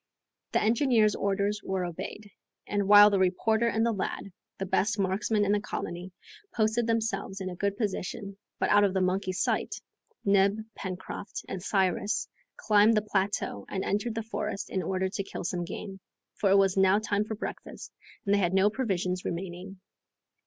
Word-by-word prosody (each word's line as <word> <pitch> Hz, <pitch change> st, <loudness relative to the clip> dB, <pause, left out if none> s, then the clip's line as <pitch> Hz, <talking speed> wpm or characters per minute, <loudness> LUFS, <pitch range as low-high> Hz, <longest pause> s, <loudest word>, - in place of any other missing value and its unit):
The -, -, +3 dB
engineer's 225 Hz, -2 st, +3 dB
orders 200 Hz, +1 st, -1 dB
were 190 Hz, -1 st, -1 dB
obeyed, 200 Hz, +4 st, -7 dB, 0.3 s
and 205 Hz, -1 st, -1 dB
while 205 Hz, 0 st, +9 dB
the 200 Hz, -, +2 dB
reporter 220 Hz, +5 st, +2 dB
and 225 Hz, 0 st, +1 dB
the 235 Hz, -, +2 dB
lad, 200 Hz, -1 st, -4 dB, 0.3 s
the 195 Hz, -, -3 dB
best 205 Hz, +3 st, +1 dB
marksmen 205 Hz, +2 st, +1 dB
in 200 Hz, -, +1 dB
the 205 Hz, -, +3 dB
colony, 180 Hz, -2 st, -5 dB, 0.4 s
posted 225 Hz, +1 st, +1 dB
themselves 225 Hz, -3 st, -1 dB
in 185 Hz, -1 st, -4 dB
a -, -, -7 dB
good 200 Hz, +2 st, -1 dB
position, 200 Hz, -1 st, -3 dB, 0.2 s
but -, -, 0 dB
out 205 Hz, 0 st, +6 dB
of 195 Hz, -1 st, +1 dB
the 190 Hz, -, +2 dB
monkeys' 185 Hz, 0 st, 0 dB
sight, -, -, -1 dB, 0.5 s
Neb, 200 Hz, +1 st, +4 dB, 0.2 s
Pencroft, 190 Hz, +1 st, -6 dB
and 190 Hz, -, -5 dB
Cyrus 200 Hz, +3 st, 0 dB, 0.3 s
climbed 215 Hz, +1 st, +4 dB
the 210 Hz, -, +2 dB
plateau 195 Hz, -, -1 dB
and 190 Hz, -, -2 dB
entered 215 Hz, +3 st, -1 dB
the 225 Hz, -, -2 dB
forest 210 Hz, -2 st, -4 dB
in 190 Hz, -, 0 dB
order 185 Hz, +2 st, -1 dB
to 200 Hz, +1 st, -3 dB
kill -, -, -7 dB
some 175 Hz, -1 st, -2 dB
game, 195 Hz, +2 st, -7 dB, 0.3 s
for 200 Hz, -, 0 dB
it 195 Hz, -, +6 dB
was 195 Hz, -1 st, +3 dB
now 190 Hz, 0 st, +5 dB
time 210 Hz, -1 st, 0 dB
for 220 Hz, +1 st, -5 dB
breakfast -, -, -7 dB, 0.3 s
and 200 Hz, -, +2 dB
they 205 Hz, -, +4 dB
had 180 Hz, -1 st, +1 dB
no 195 Hz, +2 st, +4 dB
provisions 185 Hz, -7 st, -1 dB
remaining. 185 Hz, +2 st, -5 dB
200 Hz, 175 wpm, -28 LUFS, 190-210 Hz, 0.5 s, while